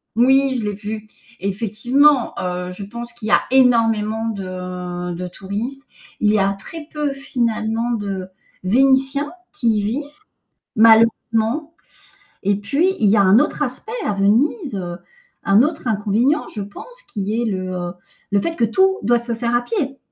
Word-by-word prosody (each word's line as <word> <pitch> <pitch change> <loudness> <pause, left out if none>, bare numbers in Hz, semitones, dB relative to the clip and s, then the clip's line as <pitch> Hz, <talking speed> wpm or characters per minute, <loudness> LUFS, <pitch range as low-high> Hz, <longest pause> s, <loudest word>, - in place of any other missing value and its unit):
Moui, 265 +3 +4
je 230 -4 -2
l'ai 210 - -1
vu. 215 +1 -6 0.3
Effectivement, 235 +7 +2
heu, 180 0 -3
je 185 +3 -8
pense 235 +4 -8
qu'il 235 -2 -7
y - - -1
a - - +5
énormément 225 -4 +3
de 180 -3 -5
de 180 +1 -5
touristes. 210 +9 -5 0.4
Il 210 - +3
y 215 - +3
a 195 0 +2
très 300 +11 -9
peu 295 -2 -2
finalement 235 -4 -1
de 200 -5 -3 0.4
Vénitiens 270 +7 +3 0.2
qui 235 - -2
y - - 0
vivent, 230 +9 -2 0.7
malheureusement. 230 +5 +3 0.7
Et 200 +1 +2
puis, 285 - +1
il 210 - +3
y 210 - +4
a 200 - +5
un 195 +3 +6
autre 295 +2 +1
aspect 275 - -4
à 210 - 0
Venise, 235 - +1
heu, 175 -3 -4 0.5
un 200 +3 +5
autre 300 0 -2
inconvénient, 225 +8 +1
je 210 - -5
pense, - - -11
qui 210 +1 -2
est - - 0
le, 185 -4 -2
heu, 175 -1 -4 0.4
le 200 0 +3
fait 330 +9 -3
que 235 - +2
tout, 380 - +3
doit 240 +3 +3
se 235 0 -2
faire 235 +1 -1
à 240 - +3
pied. 275 - -3
225 Hz, 165 wpm, -20 LUFS, 200-265 Hz, 0.7 s, un